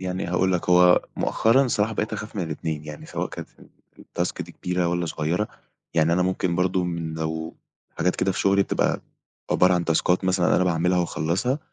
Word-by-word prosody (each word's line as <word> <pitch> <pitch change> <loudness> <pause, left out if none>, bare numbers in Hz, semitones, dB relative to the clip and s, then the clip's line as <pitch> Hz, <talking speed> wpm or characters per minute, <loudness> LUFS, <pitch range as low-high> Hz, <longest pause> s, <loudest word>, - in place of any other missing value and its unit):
يعني 90 0 -3
هاقول 90 +2 +1
لك، 90 0 -1
هو 90 0 +6
مؤخرًا 130 +4 +3
صراحة 110 -1 +1
بقيت 110 0 -2
أخاف 110 0 -6
من 95 - -1
الاتنين، 80 -1 -4
يعني 75 -1 -9
سواء - - -3
كانت - - -8 0.5
الTask - - -3
دي - - -12
كبيرة 90 0 -1
والًا 85 0 -1
صغيرة، 80 +6 -1 0.5
يعني 80 0 +3
أنا 90 +1 +2
ممكن 90 -1 0
برضه 90 0 +1
من 85 -2 -3
لو 80 0 -4 0.4
حاجات 90 +2 +1
كده 95 - +1
في - - -3
شغلي 100 0 +4
بتبقى - - 0 0.5
عبارة 90 0 +4
عن 90 -1 0
تاسكات 90 +3 +1
مثلًا 95 -1 +2
أنا 90 - +3
باعملها 90 +1 +1
واخلصها، 90 - -1
90 Hz, 185 wpm, -24 LUFS, 85-95 Hz, 0.5 s, هو